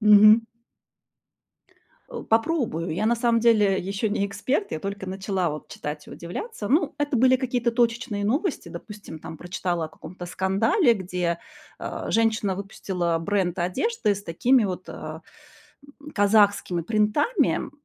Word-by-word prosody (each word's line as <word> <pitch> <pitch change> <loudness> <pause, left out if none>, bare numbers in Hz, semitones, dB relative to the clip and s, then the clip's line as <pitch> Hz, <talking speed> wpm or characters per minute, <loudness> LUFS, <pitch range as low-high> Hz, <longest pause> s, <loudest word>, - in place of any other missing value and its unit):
Мгм. 215 +1 +8 1.7
Э, - - -6
попробую. 225 - +1
Я 195 +7 -1
на 235 - +3
самом 235 0 +2
деле 210 -4 +4
ещё 195 +4 -2
не 205 -1 0
эксперт, 260 - -2
я - - -2
только 195 +1 -5
начала 190 -2 -1
вот 150 0 -6
читать 150 0 -6
и - - -11
удивляться. 205 - -6
Ну, 300 +2 +2
это 290 -3 0
были 260 +2 +5
какие-то 245 -2 0
точечные 230 -3 0
новости. 285 - -1
Допустим, 205 -7 -9
там 160 -1 -9
прочитала 175 -2 -2
о - - -7
каком-то 175 +3 -10
скандале, 200 - +2
где, 180 -4 -2 0.4
э, - - -5
женщина 220 -4 +1
выпустила 180 -3 -2
бренд 185 -1 -1
одежды 210 - 0
с 200 - -8
такими 240 +8 +3
вот, 185 -1 -5
э, - - -7 0.8
м, 300 +1 -10
казахскими 205 - +3
принтами, 230 - +2
м. - - -6
205 Hz, 145 wpm, -25 LUFS, 180-235 Hz, 1.7 s, Мгм